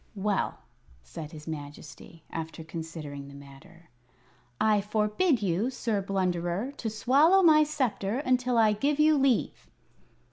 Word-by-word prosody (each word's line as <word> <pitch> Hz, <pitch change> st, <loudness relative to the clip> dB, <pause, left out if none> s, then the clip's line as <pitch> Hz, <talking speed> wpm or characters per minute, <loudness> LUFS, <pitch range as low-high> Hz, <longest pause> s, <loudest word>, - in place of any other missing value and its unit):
"Well," 200 Hz, 0 st, -1 dB, 0.4 s
said 150 Hz, -, -9 dB
his 155 Hz, -1 st, -11 dB
Majesty, 150 Hz, +1 st, -9 dB
after 160 Hz, 0 st, -6 dB
considering 160 Hz, -3 st, -7 dB
the 140 Hz, -, -12 dB
matter, 140 Hz, +4 st, -16 dB, 0.7 s
"I 215 Hz, -2 st, +3 dB
forbid 215 Hz, -, 0 dB
you, 195 Hz, +6 st, 0 dB
Sir 225 Hz, -5 st, -2 dB
Blunderer, 185 Hz, +3 st, -2 dB
to 225 Hz, -, -3 dB
swallow 285 Hz, -, +4 dB
my 305 Hz, -2 st, +6 dB
sceptre 245 Hz, -8 st, -1 dB
until 255 Hz, -3 st, +1 dB
I 220 Hz, -2 st, +4 dB
give 280 Hz, +8 st, -1 dB
you 305 Hz, 0 st, +5 dB
leave." 265 Hz, -, 0 dB
205 Hz, 130 wpm, -28 LUFS, 160-255 Hz, 0.7 s, my